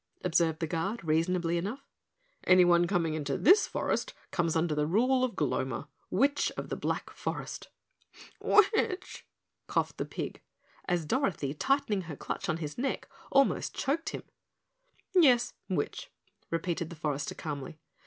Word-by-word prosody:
observed 165 -2 +2
the 165 - 0
Guard 180 +8 -2
reasonably 170 +2 +1
enough. 225 +10 -5 0.6
"Anyone 175 -1 +6
coming 170 -4 +1
into 145 -3 -2
this 385 +6 +6
forest - - -2 0.2
comes 170 -3 0
under 165 -1 +1
the 150 0 +1
rule 255 +9 +3
of 250 -3 -1
Gloma, 130 -4 -1 0.2
Witch 280 +8 +2
of - - -5
the - - -2
Black - - -3
Forest." - - -5 0.7
"Witch?" 405 -2 +2 0.4
coughed - - -1
the - - -1
pig, - - -5 0.4
as 175 -3 0
Dorothy, 180 - 0
tightening 220 - +1
her 150 - -5
clutch 195 - -4
on 160 - +1
his 155 +4 -5
neck, 270 +1 -2 0.2
almost 275 -1 +3
choked 310 +5 -1
him. - - -6 0.9
"Yes, 255 -9 +5 0.2
witch," 170 -6 -2 0.4
repeated 170 0 -2
the 170 - -8
forester 145 -3 -2
calmly. 150 0 -5
175 Hz, 140 wpm, -30 LUFS, 160-250 Hz, 0.9 s, Anyone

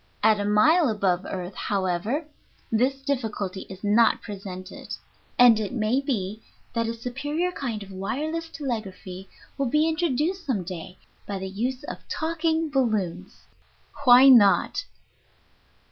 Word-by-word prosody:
At 215 -1 +5
a 205 - -1
mile 275 - +4
above 190 -4 0
earth, 185 0 -5
however, 200 - -1 0.5
this 260 +4 +1
difficulty 215 -8 -3
is 190 +1 -10
not 215 +3 +4
presented, 190 -2 -7 0.4
and 240 -3 +7
it 215 +2 -3
may 235 +2 +1
be 215 -6 -3 0.3
that 230 -1 0
a 230 - -2
superior 290 +9 -2
kind 235 - -4
of 195 - -13
wireless 305 +13 -3
telegraphy 195 - -6 0.3
will 275 - +1
be 305 +4 +3
introduced 325 +3 0
some 215 -9 0
day 180 0 -8 0.3
by 200 - -3
the 190 - -5
use 250 +7 -3
of - - -6
talking 325 0 0
balloons. 205 - -1 0.6
Why 255 0 +8
not? 230 -7 +5
225 Hz, 130 wpm, -25 LUFS, 195-275 Hz, 0.6 s, Why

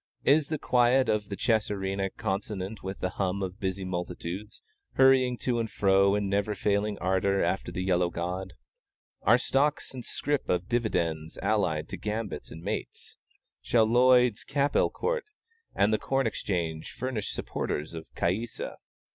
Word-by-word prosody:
Is 145 +1 +5
the 155 - -1
quiet 125 0 +3
of 105 -1 0
the 100 - -3
chess 110 0 +1
arena 95 -1 -2
consonant 100 0 -4
with 95 +1 -6
the 90 - 0
hum 95 +1 0
of 95 +2 -5
busy 95 0 -2
multitudes, 90 +3 -5 0.3
hurrying 130 -2 +5
to 120 -2 0
and 115 -1 -1
fro 100 0 +3
in 105 -1 0
never 100 +2 0
failing 100 +1 0
ardor 95 +1 +1
after 90 +3 -1
the 90 - -3
yellow 90 -1 +2
god? 90 +2 -4 0.7
Are 120 +5 +5
stocks 140 +4 0
and 125 -2 -7
scrip 145 +3 -2
and 90 +1 +1
dividends 85 -10 -1
allied 85 -8 +1
to - - -5
gambits 105 0 -4
and 80 +2 -10
mates? - - -5 0.5
Shall 115 -2 +3
Lloyd's 125 0 +4
Capel 140 +1 +2
Court 480 0 -2 0.5
and 105 +2 +3
the 110 - +2
Corn 135 -1 0
Exchange 85 -7 -2
furnish 125 -5 -3
supporters 75 +3 -3
of 80 -1 -7
Caïssa? 110 +7 -2
100 Hz, 155 wpm, -28 LUFS, 95-120 Hz, 0.7 s, Is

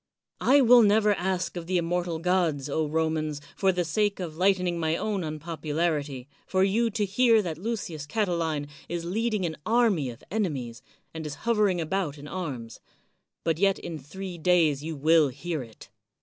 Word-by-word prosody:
I 280 +2 +5
will 245 -1 +7
never 210 0 +4
ask 185 -1 -2
of 170 -1 -6
the 185 0 +1
im 170 - 0
mortal 175 -1 -1
gods, 165 -5 +1
Romans, 155 0 0 0.2
for 195 -1 +3
the 180 -1 -1
sake 205 +5 0
of 170 -4 -5
lighten 185 +1 +2
ing 175 -1 -1
my 160 0 0
own 205 -4 -2
unpopularity, 155 -3 -2 0.2
for 185 0 +2
you 225 +4 +2
to 210 -1 -1
hear 225 +2 +4
that 165 -3 -4
Lucius 180 -8 -4
Catiline 165 -7 -1 0.2
is 170 -1 -3
leading 215 +1 0
an 160 -2 -3
army 220 - +2
of 120 0 -11
enemies, 140 - -2 0.3
and 160 -1 -5
is 145 - -6
hovering 210 -6 +2
about 165 -2 -2
in 145 +1 -10
arms; 135 -11 -5 0.6
but 165 -1 0
yet 195 0 +3
in 165 -3 -6
three 180 +5 -8
days 160 -5 +3
you 160 0 -4
will 155 +2 +4
hear 145 +4 -4
it. 115 -4 -12
170 Hz, 175 wpm, -27 LUFS, 155-195 Hz, 0.6 s, will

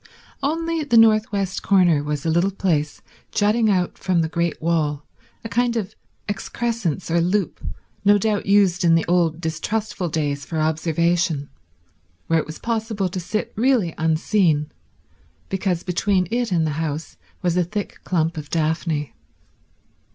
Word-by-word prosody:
Only 330 +3 -1
the 245 -5 +3
north 220 -1 +5
west 195 -2 -2
corner 175 -7 +3
was 150 0 -3
a 160 - +2
little 170 +4 +2
place 165 -7 -1 0.3
jutting 215 +2 +2
out 180 -3 0
from 185 -3 +1
the 160 - 0
great 170 0 -1
wall, 155 -3 0 0.4
a - - -4
kind 235 0 +1
of 200 -5 -3 0.3
excrescence 205 -4 -2
or 170 0 +3
loop, 180 +1 -1 0.4
no 205 +1 +6
doubt 205 -1 -1
used 195 -2 +4
in 165 -1 +5
the 165 - +1
old 170 -2 +2
distrustful 175 +4 -2
days 145 -2 -1
for 160 - -5
observation, 160 0 0 0.7
where 165 0 +2
it - - -4
was 155 - -7
possible 220 -4 -2
to 185 +1 -4
sit 215 +5 -3
really 225 -7 +2
unseen, 160 -1 +2 0.8
because 190 -3 -1
between 185 0 +1
it 240 -2 0
and 165 -3 +2
the 155 - 0
house 155 0 -4 0.3
was 175 -1 +1
a 180 - +3
thick 205 +4 -5
clump 165 -2 0
of 150 -1 -6
daphne. 160 -2 -1
180 Hz, 150 wpm, -22 LUFS, 160-205 Hz, 0.8 s, no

